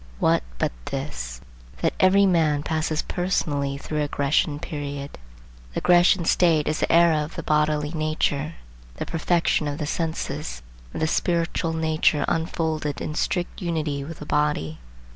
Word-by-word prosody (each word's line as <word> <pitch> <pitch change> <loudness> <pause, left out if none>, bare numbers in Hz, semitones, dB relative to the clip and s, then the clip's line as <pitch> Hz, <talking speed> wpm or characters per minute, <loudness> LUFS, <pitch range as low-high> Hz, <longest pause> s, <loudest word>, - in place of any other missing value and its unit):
What - - +3 0.2
but - - 0
this, - - -5 0.4
that - - +2
every 195 +2 +5
man 160 -6 +2
passes 155 0 -1
personally 145 -6 -1
through 150 +1 -3
a 145 - 0
Grecian 145 +1 +1
period. 145 -2 -6 0.6
The - - -1
Grecian 175 0 +5
state 165 -3 +3
is 155 - 0
the - - +1
era 170 -1 +5
of 150 - -8
the - - -5
bodily 150 -1 +1
nature, 155 -1 -1 0.4
the - - -4
perfection 165 -2 +1
of 145 0 -3
the 150 - -2
senses,—of 140 - -5
the 155 - +2
spiritual 165 0 0
nature 160 -2 +2
unfolded 160 -2 -1
in 155 - -4
strict 175 +4 -2
unity 155 -5 -1
with 160 +3 -8
the 150 - -8
body. 150 - 0
155 Hz, 145 wpm, -24 LUFS, 145-165 Hz, 0.6 s, every